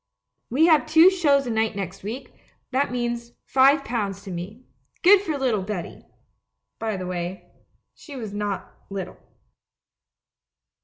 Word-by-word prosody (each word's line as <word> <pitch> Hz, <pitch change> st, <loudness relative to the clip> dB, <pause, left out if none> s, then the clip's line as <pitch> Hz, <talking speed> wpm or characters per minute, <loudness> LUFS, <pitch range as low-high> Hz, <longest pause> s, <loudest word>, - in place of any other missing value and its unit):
We 285 Hz, +7 st, +4 dB
have 315 Hz, -3 st, +4 dB
two 325 Hz, +4 st, +7 dB
shows 290 Hz, -7 st, +3 dB
a 240 Hz, -, -2 dB
night 220 Hz, -1 st, 0 dB
next 195 Hz, -1 st, -5 dB
week 240 Hz, +6 st, -7 dB, 0.2 s
— -, -, -44 dB
that 265 Hz, 0 st, +1 dB
means 240 Hz, -1 st, -3 dB
five 275 Hz, +2 st, +4 dB
pounds 205 Hz, -4 st, -3 dB
to 195 Hz, -, -8 dB
me. 190 Hz, +8 st, -7 dB, 0.4 s
Good 385 Hz, +2 st, +7 dB
for 320 Hz, -7 st, -2 dB
little 250 Hz, -7 st, +1 dB
Betty!' 190 Hz, -2 st, -6 dB, 0.7 s
By 220 Hz, -3 st, -2 dB
the 185 Hz, -, -5 dB
way, 180 Hz, +1 st, -5 dB, 0.4 s
she 290 Hz, -, -12 dB
was 220 Hz, -6 st, -6 dB
not 205 Hz, -1 st, -4 dB, 0.2 s
little. 195 Hz, -2 st, -6 dB
235 Hz, 145 wpm, -24 LUFS, 200-275 Hz, 0.7 s, two